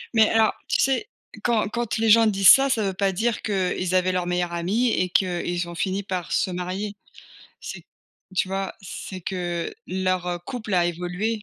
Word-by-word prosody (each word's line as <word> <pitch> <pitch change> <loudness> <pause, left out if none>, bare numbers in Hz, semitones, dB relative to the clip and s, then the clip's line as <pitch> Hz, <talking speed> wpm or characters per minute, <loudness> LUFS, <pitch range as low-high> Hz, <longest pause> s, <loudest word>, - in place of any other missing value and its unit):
Mais 220 -1 +6
alors, 225 -1 +3
tu - - +1
sais, 270 +10 +1 0.4
quand 230 -4 +2
quand 235 0 -2
les 225 0 +2
gens 225 +1 +7
disent 195 -2 +3
ça, 275 0 +7
ça 230 -5 +1
veut 195 -1 -1
pas 195 +1 +1
dire 220 +4 -1
qu'ils 185 -2 -1
avaient 185 0 +3
leur 180 -1 -1
meilleur 175 -1 -1
ami 195 +9 +1
et 185 -4 0
qu'ils 175 -1 0
ont 170 - -7
fini 190 +3 -1
par 185 -3 -4
se 190 - +1
marier. 185 +3 -4 0.7
C'est - - -8 0.5
tu 185 - +1
vois? 195 0 -2
C'est 190 0 -7
que 175 - -3
leur, 185 -1 -1
heu, 175 -1 -2
couple 215 +4 -6
a 175 -2 +3
évolué. 180 +6 -2
190 Hz, 190 wpm, -24 LUFS, 180-215 Hz, 0.7 s, gens